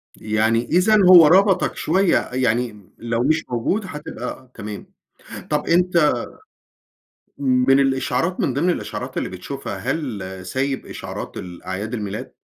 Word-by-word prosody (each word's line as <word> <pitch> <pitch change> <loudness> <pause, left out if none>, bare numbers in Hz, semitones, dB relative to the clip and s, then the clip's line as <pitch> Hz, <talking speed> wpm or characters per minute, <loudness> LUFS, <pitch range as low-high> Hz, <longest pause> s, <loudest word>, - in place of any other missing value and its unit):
يعني 110 +2 +1
إذًا، 185 +6 +3
هو 175 -4 +10
ربطك 190 +2 +3
شويّة 185 +4 +2
يعني، 120 -5 -1
لو 115 +1 -2
مش 155 +2 +2
موجود 125 - -1
هتبقى 130 -5 -7
تمام. 105 0 -8 0.6
طب 150 -1 -1
أنت 170 -2 +3 1.2
من 135 0 +3
الإشعارات، 135 +6 0
من 130 - 0
ضمن 160 +7 +1
الإشعارات 175 - -4
اللي - - -2
بتشوفها، 135 +10 -6
هل 130 -11 -3 0.2
سايب 135 +7 -2
إشعارات - - -7
الأعياد 95 +5 -6
الميلاد؟ 105 -2 -5
130 Hz, 120 wpm, -21 LUFS, 115-165 Hz, 1.2 s, هو